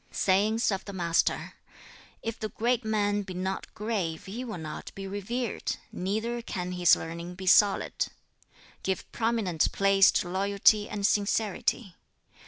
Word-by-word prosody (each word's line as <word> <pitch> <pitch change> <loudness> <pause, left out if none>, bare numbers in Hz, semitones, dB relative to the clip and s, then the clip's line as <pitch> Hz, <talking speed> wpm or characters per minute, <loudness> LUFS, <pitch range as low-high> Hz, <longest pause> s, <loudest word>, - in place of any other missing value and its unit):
'" - - -34
Sayings 210 +4 +3
of 195 - -2
the 200 - -7
Master: 170 -3 0 0.7
"If 225 0 -4
the 215 - -3
great 240 +3 0
man 205 -1 +1
be 190 -2 -7
not 190 +1 -3
grave, 200 -7 -2
he 215 +6 -5
will 225 -6 -5
not 155 -2 -7
be 195 - -6
revered, 205 +5 -3 0.2
neither 220 +6 -2
can 180 -5 -4
his 180 -2 +5
learning 170 +2 -6
be 190 +1 -8
solid. 200 +2 +4 0.7
"Give 190 -1 -3
prominent 225 -8 0
place 195 0 +5
to - - 0
loyalty 200 +3 +3
and 200 -1 -2
sincerity. 210 0 0
200 Hz, 145 wpm, -28 LUFS, 185-220 Hz, 0.7 s, his